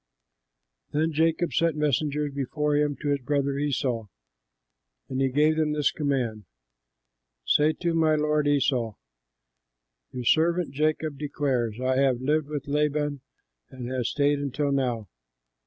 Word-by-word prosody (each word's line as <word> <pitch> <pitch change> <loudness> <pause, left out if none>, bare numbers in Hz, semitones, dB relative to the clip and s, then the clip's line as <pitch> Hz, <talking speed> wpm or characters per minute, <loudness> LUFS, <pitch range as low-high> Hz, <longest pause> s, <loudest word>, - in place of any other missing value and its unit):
Then 155 +2 +1
Jacob 165 +2 +1
sent 165 -2 +2
messengers 150 0 0
before 145 +2 -1
him 145 -1 +1
to 145 - 0
his 140 -1 +1
brother 140 +1 0
Esau. 130 -5 -1 1.0
And 130 0 -2
he 135 - +2
gave 150 +4 +3
them 155 -1 +1
this 150 -2 +2
command, 125 -8 -2 1.0
"Say 150 +1 +3
to 170 0 -2
my 160 -1 +3
lord 150 -1 +1
Esau: 130 -6 +1 1.2
'Your 125 -2 -5
servant 170 +5 +2
Jacob 155 0 -1
declares, 130 -6 -1
I 130 0 +1
have 135 -3 +2
lived 150 +3 0
with 145 -2 -5
Laban 150 -1 0 0.5
and 130 -2 -7
have 125 -3 -1
stayed 145 0 +1
until 145 +1 -1
now. 125 -6 -1
145 Hz, 135 wpm, -26 LUFS, 130-150 Hz, 1.2 s, gave